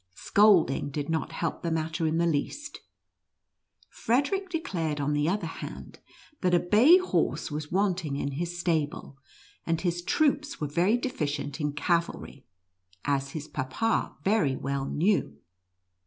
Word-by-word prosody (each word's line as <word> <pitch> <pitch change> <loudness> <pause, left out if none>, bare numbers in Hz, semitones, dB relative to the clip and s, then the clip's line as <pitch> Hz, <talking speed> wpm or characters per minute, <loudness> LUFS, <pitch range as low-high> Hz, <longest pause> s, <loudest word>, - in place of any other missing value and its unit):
Scolding 195 -10 +4
did 145 +1 -4
not 160 0 -1
help 165 0 -3
the 170 - -2
matter 160 0 -1
in 160 +1 0
the 170 - +2
least. 170 - -2 1.1
Frederic 290 - 0
declared, 170 - -2
on 145 +1 0
the 145 +2 +1
other 195 -1 -1
hand, 165 - -8 0.4
that 180 -1 +3
a - - +5
bay 225 - +6
horse 370 - -1
was 150 0 -5
wanting 180 -6 0
in 140 0 -2
his 170 +5 -4
stable, 155 -5 -2 0.4
and 165 -1 -1
his 175 -1 -1
troops 290 - +1
were 150 - -1
very 175 +10 +2
deficient 145 - -3
in 150 -1 -1
cavalry, 165 -3 -2 0.6
as 140 -1 -1
his 155 -2 -5
Papa 150 +13 -1
very 190 -10 +2
well 135 +1 -2
knew. 160 - 0
165 Hz, 140 wpm, -28 LUFS, 145-200 Hz, 1.1 s, bay